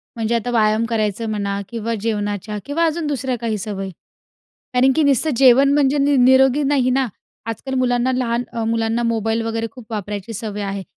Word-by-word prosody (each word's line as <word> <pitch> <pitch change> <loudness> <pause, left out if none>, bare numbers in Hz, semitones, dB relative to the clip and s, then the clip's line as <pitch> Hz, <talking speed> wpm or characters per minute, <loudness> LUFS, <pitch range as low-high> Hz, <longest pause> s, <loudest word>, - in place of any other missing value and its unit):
म्हणजे 230 0 -1
आता 235 +1 -2
व्यायाम 220 -1 +2
करायचं 220 -1 -1
म्हणा 200 -2 -2
किंवा 230 -1 -3
जेवणाच्या 210 -1 -2
किंवा 320 +4 0
अजून 320 -1 -1
दुसऱ्या 265 -3 -2
काही 225 -2 -1
सवयी. 195 -1 -5 0.8
कारण 255 +2 +4
की 315 - +3
नुसतं 285 +2 +2
जेवण 270 +2 +6
म्हणजे 285 0 +3
नि 285 0 +3
निरोगी 260 +3 +5
नाही 270 -3 +2
ना. 260 0 +1 0.4
आजकाल 230 +4 -5
मुलांना 245 0 +1
लहान 245 -2 -1
अ, 230 - -2
मुलांना 225 +1 0
मोबाईल 225 -1 0
वगैरे 225 0 -2
खूप 245 -4 -14
वापरायची 210 0 -5
सवय 210 -1 -5
आहे. 195 -1 -4
230 Hz, 175 wpm, -20 LUFS, 215-260 Hz, 0.8 s, जेवण